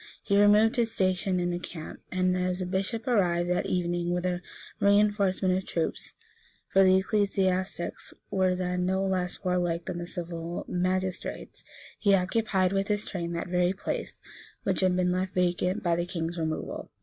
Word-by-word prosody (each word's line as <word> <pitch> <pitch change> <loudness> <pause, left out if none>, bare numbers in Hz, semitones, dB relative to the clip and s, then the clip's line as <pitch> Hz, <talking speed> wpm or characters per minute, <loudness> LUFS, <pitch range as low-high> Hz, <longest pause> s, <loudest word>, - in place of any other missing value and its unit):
He 200 - +1
removed 210 +3 +5
his 230 -2 +1
station 185 -2 +1
in 175 0 0
the 175 - -2
camp; 165 -3 -7
and 185 0 +1
as 180 0 -1
a 185 - -2
bishop 195 +5 -2
arrived 175 -7 +2
that 180 - 0
evening 175 -1 -1
with 180 0 -1
a 180 -1 -1 0.4
reënforcement 200 -2 +3
of 190 - -1
troops, 165 -3 -3 0.5
(for 195 - +5
the 185 0 +6
ecclesiastics 190 -3 -1 0.2
were 185 -1 +2
then 180 0 -1
no 190 +1 +1
less 185 -2 -2
warlike 175 -2 0
than 180 -2 -4
the 175 - -5
civil 170 -1 -5
magistrates,) 185 +1 -2 0.4
he 200 -2 +5
occupied 190 0 +1
with 195 0 0
his 210 0 0
train 170 -3 -4
that 170 - -3
very 180 +1 +2
place 195 - -4 0.4
which 190 -3 0
had 185 -1 +3
been 180 0 +2
left 185 +1 -2
vacant 180 +2 +1
by 170 -2 +2
the 175 +1 -2
king's 170 -1 -3
removal. 160 -1 -3
185 Hz, 170 wpm, -28 LUFS, 175-195 Hz, 0.5 s, the